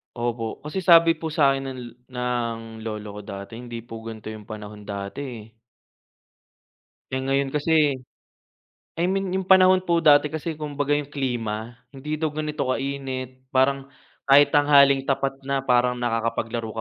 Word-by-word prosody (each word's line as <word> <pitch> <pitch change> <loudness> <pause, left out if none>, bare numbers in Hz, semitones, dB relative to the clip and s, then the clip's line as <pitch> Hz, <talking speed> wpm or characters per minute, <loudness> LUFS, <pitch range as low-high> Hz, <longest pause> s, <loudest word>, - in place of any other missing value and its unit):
Opo, 120 -2 -3
kasi 150 +6 -5
sabi 165 -2 +6
po 160 - -5
sa'kin 140 -4 +2
ng 130 - -8
lo 120 - -9 0.2
ng 125 -2 -2 0.3
lolo 105 -1 -6
ko - - -6
dati, 100 +3 -8
hindi 120 -1 -7
po 115 -1 -9
gan'to 110 -1 -8
'yong 110 -1 -9
panahon 105 -2 -9
dati 100 +4 -5
eh. 120 -5 -8 1.7
Eh, 130 - -1
ngayon 135 0 0
kasi 150 -2 +2 1.0
I 170 - +1
mean, 195 0 -1
'yong 190 0 -2
panahon 185 0 +6
po 170 -1 +2
dati 145 -1 +6
kasi 160 +2 -4
kumbaga 145 -1 -2
'yong 145 -1 0
klima, 120 -4 -3 0.2
hindi 150 +3 -4
daw 160 - +1
ganito 150 -2 -2
kainit, 130 -1 -4
parang 135 +1 +2 0.4
kahit 140 +1 +7
tanghaling 140 -2 +5
tapat 135 0 +1 0.2
na, 135 -1 0
parang 125 -1 +3
nakakapaglaro 115 -1 -2
135 Hz, 150 wpm, -24 LUFS, 115-150 Hz, 1.7 s, kahit